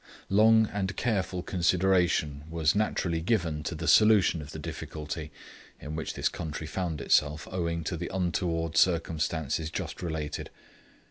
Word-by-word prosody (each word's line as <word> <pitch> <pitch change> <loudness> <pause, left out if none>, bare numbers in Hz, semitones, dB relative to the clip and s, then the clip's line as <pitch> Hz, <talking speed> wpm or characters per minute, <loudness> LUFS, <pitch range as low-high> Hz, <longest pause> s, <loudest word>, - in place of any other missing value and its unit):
Long 110 +2 +5
and 100 -1 -2
careful 95 -6 -1
consideration 90 -5 +1
was 80 -1 +2
naturally 90 -5 0
given 85 -6 0
to 85 - -3
the 80 +1 -5
solution 105 -6 +5
of 75 - -9
the 80 - -7
difficulty 75 0 -6 0.5
in 75 +1 -6
which 80 - -4
this - - +1
country 80 -2 -5
found 80 -1 -3
itself 75 +2 +2
owing 85 -2 -2
to 80 - -2
the 85 +1 -4
untoward 85 -2 -1
circumstances 80 -3 +1
just - - -5
related. 80 -4 -4
85 Hz, 140 wpm, -28 LUFS, 80-95 Hz, 0.5 s, Long